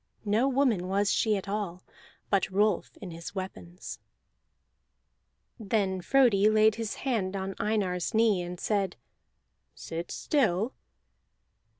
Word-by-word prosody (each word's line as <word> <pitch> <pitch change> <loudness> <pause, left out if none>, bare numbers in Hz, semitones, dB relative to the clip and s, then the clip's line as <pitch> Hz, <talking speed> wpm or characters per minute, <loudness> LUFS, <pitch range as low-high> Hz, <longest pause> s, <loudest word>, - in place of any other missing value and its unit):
No 215 +6 +2
woman 250 -9 +2
was 200 +1 +1
she 215 -2 +2
at 195 - -6
all, 195 -3 -3 0.5
but 200 -2 +2
Rolf 205 +1 +1
in 190 -4 -8
his 165 +2 -8
weapons! 185 -2 -7 1.6
Then 195 -3 0
Frodi 215 -3 +4
laid 215 0 +5
his 225 -1 -4
hand 205 -7 0
on 195 0 -3
Einar's 195 -5 0
knee, 220 -4 +4
and 175 0 -6
said: 200 -4 0 0.8
"Sit 165 +1 -6
still!" 225 - +1
200 Hz, 115 wpm, -29 LUFS, 185-220 Hz, 1.6 s, laid